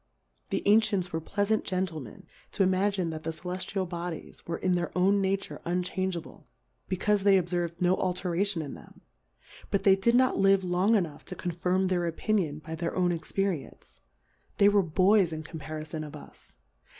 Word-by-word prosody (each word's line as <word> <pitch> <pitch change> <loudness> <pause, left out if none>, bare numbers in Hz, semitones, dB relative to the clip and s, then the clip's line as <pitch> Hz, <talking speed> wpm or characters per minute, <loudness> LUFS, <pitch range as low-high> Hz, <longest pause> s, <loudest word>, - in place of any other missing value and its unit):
The - - -1
Ancients 205 -4 +3
were 160 - -1
pleafant 205 +5 0
Gentlemen, 165 - -4 0.3
to 195 - +3
imrJginet'iit 185 -4 0
the 165 - -4
Celeftial 185 +3 -3
Bodies 175 -1 -6
werein 175 +2 0
their 175 -1 -1
own 195 +2 +4
iNiature 195 0 -2
unchangeable, 180 0 -3 0.4
bccaufe 200 +2 +1
they 195 0 +5
ob.^rv'd 175 -1 -1
no 180 0 +3
Alteratioa 180 0 -1
in 140 - -7
them; - - -14 0.7
but 200 - 0
thty 195 - +7
did 235 +4 +3
not 255 +1 +3
live 195 0 +4
long 185 +5 +2
enough 170 -8 -1
to - - -7
CO 180 - -3
firm 180 +3 0
their 175 -2 0
Opinion 170 -3 0
by 160 +1 -8
their 170 +1 -3
own 180 -1 +2
Ex 165 -2 -5
perience; 195 -7 -3 0.6
they 200 - +6
were 205 -1 +4
Boys 185 +2 +3
in 155 0 -5
compari 155 0 -7
fon 155 0 -5
of 150 - -8
us. - - -14
180 Hz, 165 wpm, -28 LUFS, 170-195 Hz, 0.7 s, thty